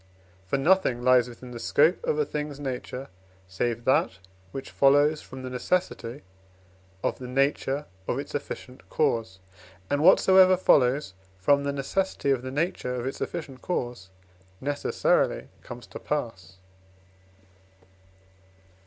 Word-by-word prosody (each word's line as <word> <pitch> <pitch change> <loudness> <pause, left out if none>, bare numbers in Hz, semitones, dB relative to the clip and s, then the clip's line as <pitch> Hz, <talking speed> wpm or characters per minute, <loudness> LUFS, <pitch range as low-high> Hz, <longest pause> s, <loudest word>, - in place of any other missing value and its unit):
For 140 - 0
nothing 135 -5 +2
lies 125 -1 +4
within 125 +1 -11
the 120 - -7
scope 155 +9 +3
of 150 - 0
a 150 - +2
thing's 150 -1 -5
nature, 130 -1 -5 0.4
save 120 +5 -2
that 110 -7 +2 0.3
which 135 - -7
follows 145 +2 +4
from 130 0 -10
the 130 - -5
necessity 130 -2 -2 0.8
of - - -1
the 125 - -7
nature 135 +2 0 0.2
of - - -1
its 140 - -6
efficient 135 -2 -7
cause, 115 -11 0 0.5
and 145 - +1
whatsoever 185 +2 +6
follows 130 - +3 0.2
from 140 +9 +3
the 140 - 0
necessity 140 +2 -1
of 130 -3 +1
the 130 - -6
nature 140 -3 -2
of 120 -1 -4
its 135 - -5
efficient 140 -7 -5
cause 120 - -3 0.5
necessarily 145 +1 0
comes 120 0 -9
to - - -9
pass. 95 - -4
135 Hz, 130 wpm, -26 LUFS, 125-150 Hz, 0.8 s, whatsoever